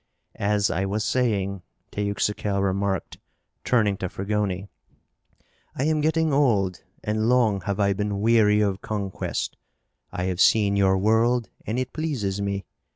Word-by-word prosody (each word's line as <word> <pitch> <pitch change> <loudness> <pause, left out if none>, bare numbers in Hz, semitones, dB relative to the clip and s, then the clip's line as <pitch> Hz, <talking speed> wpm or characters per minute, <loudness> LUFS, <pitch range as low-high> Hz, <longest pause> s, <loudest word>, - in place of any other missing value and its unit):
"As 100 0 +1
I 95 +3 0
was 105 +2 -1
saying," 100 -6 0 0.3
Teuxical 100 -1 -1
remarked, 95 0 -1 0.4
turning 105 -5 +2
to 95 - -3
Fragoni, 100 -1 -2 1.1
"I 130 - -1
am 155 0 +1
getting 160 0 +1
old 105 -10 +2 0.2
and 110 +1 0
long 115 -6 +3
have 100 0 -2
I 100 -1 +3
been 100 0 -2
weary 105 -1 +4
of 100 -2 0
conquest. 100 -3 -3 0.5
I 90 - -3
have 90 -1 -1
seen 100 -2 +4
your 95 -1 +3
world 110 +2 +2 0.2
and 110 +4 -1
it 130 - -3
pleases 120 -12 -2
me. 100 -1 -2
105 Hz, 140 wpm, -24 LUFS, 100-115 Hz, 1.1 s, weary